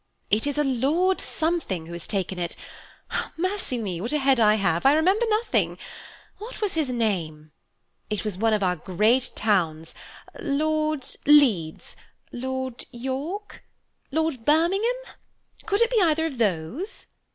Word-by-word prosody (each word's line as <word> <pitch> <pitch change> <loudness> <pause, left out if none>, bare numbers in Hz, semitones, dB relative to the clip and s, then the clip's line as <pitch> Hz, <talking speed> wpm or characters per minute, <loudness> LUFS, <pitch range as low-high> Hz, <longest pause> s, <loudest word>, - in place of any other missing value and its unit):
"It 220 +6 +3
is 285 - -2
a 295 - +3
Lord 295 +9 +1
Something 315 - -2
who 170 - -9
has 170 -1 -6
taken 190 -2 -1
it. 170 -1 -3 0.8
Mercy 370 -6 -2
me, 190 -7 -3
what 230 - -2
a 300 - +2
head 270 -3 +3
I 215 -1 +5
have, 175 -5 +1
I 275 - +6
remember 380 +9 +3
nothing! 435 +2 +1 0.6
What 445 +4 -8
was 415 -3 -1
his 315 -5 0
name? 170 -11 -2 0.6
It 210 0 -3
was 210 -3 -1
one 220 +3 +1
of 210 -2 +1
our 180 -1 +2
great 215 +10 +1
towns, 165 -7 0 0.5
Lord 310 0 0 0.2
Leeds, 235 - +4 0.4
Lord 260 0 -4
York, 275 - -5 0.5
Lord 315 -5 -1
Birmingham–could 400 - -1
it 470 - 0
be 455 -4 +3
either 320 -2 +3
of 275 -7 -4
those?" 215 - -1
260 Hz, 140 wpm, -25 LUFS, 205-320 Hz, 0.8 s, I